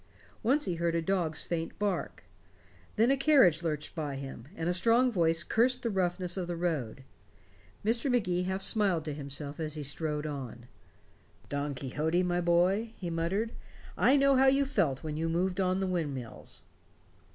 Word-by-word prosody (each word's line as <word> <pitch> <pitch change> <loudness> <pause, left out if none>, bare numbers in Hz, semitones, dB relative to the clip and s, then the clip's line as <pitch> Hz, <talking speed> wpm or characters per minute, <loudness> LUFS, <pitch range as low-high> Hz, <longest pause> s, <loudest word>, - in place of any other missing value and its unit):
Once 275 +6 +2
he 180 - -1
heard 170 0 0
a - - +2
dog's 165 -3 -1
faint 165 -1 -3
bark. 205 -2 -2 0.7
Then 230 +4 +4
a - - +4
carriage 265 - +5
lurched 155 -3 -3
by 150 -4 -3
him, 135 -3 -8
and 165 - -3
a 175 - +2
strong 235 +7 +4
voice 165 -4 +2
cursed 250 +5 +2
the 230 - 0
roughness 180 -1 -1
of 180 -2 -2
the 175 - -3
road. 150 -8 -2 0.8
Mr. 230 +5 +1
Magee 180 -8 +1
half 190 +1 -2
smiled 190 -7 +1
to 150 - -3
himself 140 +1 -5
as 155 -1 -3
he 150 - -4
strode 150 +1 -2
on. 130 -5 -6 0.8
"Don 145 0 -2
Quixote, 155 +7 0
my 175 0 0
boy," 185 +6 +2
he 175 -3 -4
muttered, 185 +7 -1 0.4
"I 270 +3 +4
know 275 0 +4
how 265 +1 +5
you 275 +1 +4
felt 145 - 0
when 155 -1 -4
you 165 +1 -1
moved 180 +3 0
on 185 0 +1
the 195 - 0
windmills." 145 -10 -4
175 Hz, 175 wpm, -30 LUFS, 155-205 Hz, 0.8 s, carriage